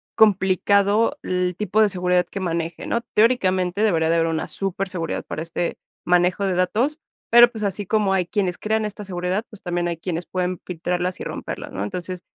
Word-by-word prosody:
complicado 200 +3 +3
el 180 -1 -1
tipo 210 0 +1
de 215 - +5
seguridad 180 -1 +1
que 195 - -5
maneje, 170 -2 -3
¿no? 235 - 0
Teóricamente, 190 -5 +2
debería 165 -7 +2
de 165 - +3
haber 165 0 +2
una 160 -1 -2
superseguridad 190 -3 -3
para - - -5
este 165 +1 -3 0.3
manejo 180 +2 +2
de 190 - +1
datos, 220 - 0 0.3
pero, 240 +1 +8
pues, 220 -3 -6
así 200 0 -2
como 205 -1 +1
hay 185 -2 +1
quienes 190 -4 -1
crean 220 0 0
esta 210 0 -5
seguridad, 185 +2 -2
pues, 215 - -13
también 175 -1 -1
hay 170 -1 -2
quienes 170 +1 -4
pueden 180 +1 -2
filtrarlas 180 +1 -2
y - - -5
romperlas, - - -6
¿no? 100 - -3
Entonces, 180 - -5
185 Hz, 185 wpm, -22 LUFS, 175-210 Hz, 0.3 s, pero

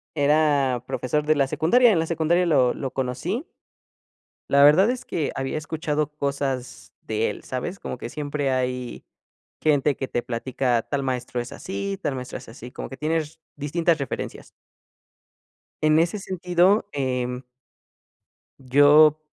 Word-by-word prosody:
era, 145 -4 +2
profesor 150 +5 -1
de 155 +1 +3
la 140 -2 +2
secundaria. 235 - +4
En 190 - +2
la 160 - 0
secundaria 170 +2 +1
lo 135 -7 +3
lo 135 -2 -5
conocí. 135 - -3 1.0
La 140 0 +5
verdad 165 +9 +6
es 250 0 -3
que 155 -4 -2
había 135 +3 -2
escuchado 155 -1 -2
cosas, 135 - -3
de 110 0 -1
él, 105 - -7
¿sabes? 155 +10 -4
Como - - -6
que - - -7
siempre 145 -1 -2
hay, 125 -1 -3 0.6
gente 145 -2 +2
que 135 - -3
te 120 - -1
platica: 125 0 -1
"Tal 140 -1 -2
maestro 125 -1 -3
es 120 - -8
así, 195 +1 -4
tal 140 - -2
maestro 125 -1 -6
es - - -12
así". 120 +1 -10
Como - - -7
que 135 - -9
tienes, 155 0 -2 0.2
distintas 165 +3 +1
referencias. 140 - -5 1.4
En 155 0 +4
ese 170 +5 +1
sentido, 185 +2 +1
em 125 -2 -2 1.2
yo, 145 +3 +5
145 Hz, 145 wpm, -24 LUFS, 130-160 Hz, 1.4 s, verdad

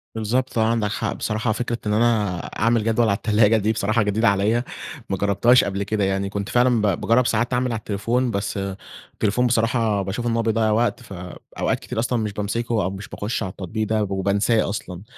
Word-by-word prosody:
بالضبط 120 +4 -1
آه، 110 - +4
عندك 110 -3 0
حق، 110 0 -2
بصراحة 110 +1 -1
فكرة 120 +1 -2
إن 105 - 0
أنا 105 -4 +2 0.2
أعمل 115 +1 +2
جدول 115 +1 +2
على 100 - +2
التلاجة 110 0 +3
دي 110 +1 +1
بصراحة 110 +1 +1
جديدة 105 +3 +1
عليَّ، 105 +4 +1 0.5
ما 95 - -1
جربتهاش 100 +6 +4
قبل 100 0 -2
كده 105 +1 -1
يعني، 95 0 0
كنت 100 0 -4
فعلًا 120 -2 +3
ب 100 -5 0
باجرب 120 +2 +3
ساعات 115 +3 0
أعمل 125 0 +1
على 115 - -2
التليفون 115 +4 -1
بس 100 0 -2 0.6
التليفون 115 +4 +1
بصراحة 115 -3 +1
باشوف 100 +5 -3
إن 115 - 0
هو 115 - +2
بيضّيع 110 -1 +1
وقت 115 +3 +1
فأوقات 90 -5 -4
كتير - - -5
أصلًا 120 +1 0
مش 105 -2 -2
بامسكه 110 +2 -1
أو 90 - 0
مش 100 +1 -7
باخُش 105 +3 -3
على 95 - -3
التطبيق 100 +4 -4
ده 110 0 +1
وبانساه 100 +3 +1
أصلًا. 95 -3 -6
110 Hz, 200 wpm, -22 LUFS, 100-115 Hz, 0.6 s, آه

